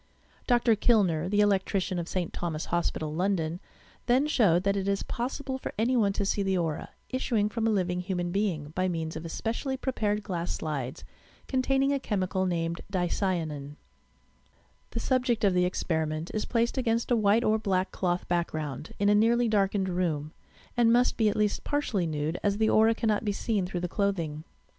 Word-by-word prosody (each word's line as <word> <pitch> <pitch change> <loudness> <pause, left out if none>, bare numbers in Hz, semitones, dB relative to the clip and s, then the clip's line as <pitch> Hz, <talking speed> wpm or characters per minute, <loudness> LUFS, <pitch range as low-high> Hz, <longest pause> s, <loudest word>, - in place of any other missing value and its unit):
Dr. 240 -2 +4
Kilner, 185 -7 +2
the 205 +1 +3
electrician 195 -2 +1
of 170 - -4
St. 180 -3 -3
Thomas' 160 -2 -3
Hospital, 160 -3 -1
London, 175 -1 0 0.5
then 255 +4 +4
showed 200 - +3
that 200 0 +2
it 195 -1 -2
is 200 0 0
pos 245 +3 -3
sible 265 -2 -4
tor - - -5
any 235 +4 +2
one 210 -5 +3
to 200 - -1
see 200 - 0
the 190 -1 +1
aura, 165 -4 -2 0.2
issuing 230 -5 0
from 225 +1 -1
a - - +3
living 180 -4 0
human 180 -1 -2
being, 175 -7 -1
by 185 +3 0
means 165 -3 -3
of 160 +1 -6
especially 235 - -3
prepared 215 -6 -1
glass 175 -4 -3
slides, 140 -5 -4 0.4
containing 270 +1 +2
a 280 - 0
chemical, 190 -5 -1
named 170 -1 -2
"Dieyanin, 175 -5 -1
"^ 145 - -11 1.1
The - - -4
subject 250 -3 +1
of 200 -2 +4
the 180 0 +3
experiment 160 -2 -2
is 215 - -1
placed 235 +2 0
against 230 -1 0
a - - +5
white 215 +1 +3
or 220 -1 +2
black 190 -3 0
cloth 180 -1 -1
background, 155 -4 -3
in 205 - +1
a 205 - +5
nearly 230 +3 +4
darkened 200 -2 +1
room, 165 -4 -1 0.4
and 235 -1 +4
must 245 +1 +3
be 220 -2 +3
at 205 - -2
least 210 -1 +1
partially 230 -12 0
nude, 155 +2 -2
as 205 0 +1
the 220 0 +2
aura 225 +1 +5
cannot 220 -2 0
be 205 -2 0
seen 200 -3 -1
through 180 -1 -4
the 180 - -1
clothing. 170 -6 -2
195 Hz, 185 wpm, -28 LUFS, 175-225 Hz, 1.1 s, a